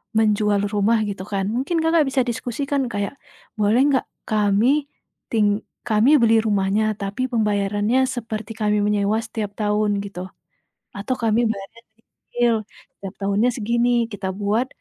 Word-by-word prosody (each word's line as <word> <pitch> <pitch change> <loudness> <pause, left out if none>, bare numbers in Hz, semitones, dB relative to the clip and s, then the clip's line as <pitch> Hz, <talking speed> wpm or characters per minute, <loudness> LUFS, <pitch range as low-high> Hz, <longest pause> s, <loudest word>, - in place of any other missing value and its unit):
menjual 210 -2 +2
rumah 210 +3 +3
gitu 200 -2 -4
kan. 195 -2 -2
Mungkin 320 +6 0
Kakak, 325 -1 +4
bisa 270 0 +1
diskusikan 255 +4 -2
kayak 205 -2 -3 0.5
"boleh 210 +4 +3
enggak 265 - +1 0.2
kami 215 +8 +2 0.4
ting 215 -3 +3 0.4
kami 220 +3 +3
beli 225 -1 +5
rumahnya 205 0 +1 0.2
tapi 200 +5 -4
pembayarannya 210 +1 +1 0.2
seperti 220 -3 -5
kami 210 -1 +1
menyewa 205 +1 +1
setiap 225 -3 -5
tahun," 210 -1 +1
gitu. 200 -3 -8 0.8
"Atau 200 +6 -2
kami 225 0 +2
bayar 200 -3 -3 0.2
nyicil 235 +1 -2 0.4
tiap 195 0 -8
tahunnya 200 +5 +2
segini 235 +1 +1 0.2
kita 200 -2 -4
buat 210 +5 0
215 Hz, 135 wpm, -22 LUFS, 205-235 Hz, 0.8 s, beli